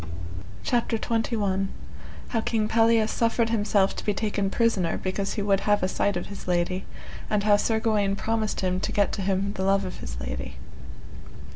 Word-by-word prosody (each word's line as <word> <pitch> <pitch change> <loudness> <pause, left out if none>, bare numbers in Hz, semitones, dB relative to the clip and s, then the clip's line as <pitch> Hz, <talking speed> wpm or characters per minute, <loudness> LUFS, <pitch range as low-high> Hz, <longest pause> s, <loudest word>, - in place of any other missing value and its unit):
CHAPTER 235 -1 +1
XXI. 215 -4 0 0.6
How 225 - 0
King 220 -2 0
Pelleas 225 -1 +3
suffered 230 0 +1
himself 205 -3 +2
to - - -5
be 210 - 0
taken 205 -2 0
prisoner 205 -6 +1
because 195 +1 -2
he 205 - -1
would 200 -1 +3
have 205 -1 +2
a - - +3
sight 200 0 0
of 175 - -4
his 200 - -9
lady, 180 +1 0 0.4
and 210 -1 +1
how 210 0 +5
Sir 220 +2 +1
Gawaine 210 -3 +1
promised 220 +1 -1
him 185 -1 0
to - - -2
get 205 -1 +2
to - - -3
him 195 +1 0
the 190 - -3
love 195 0 +2
of 185 - -6
his - - -6
lady. 65 +1 -5
205 Hz, 180 wpm, -26 LUFS, 190-220 Hz, 0.6 s, how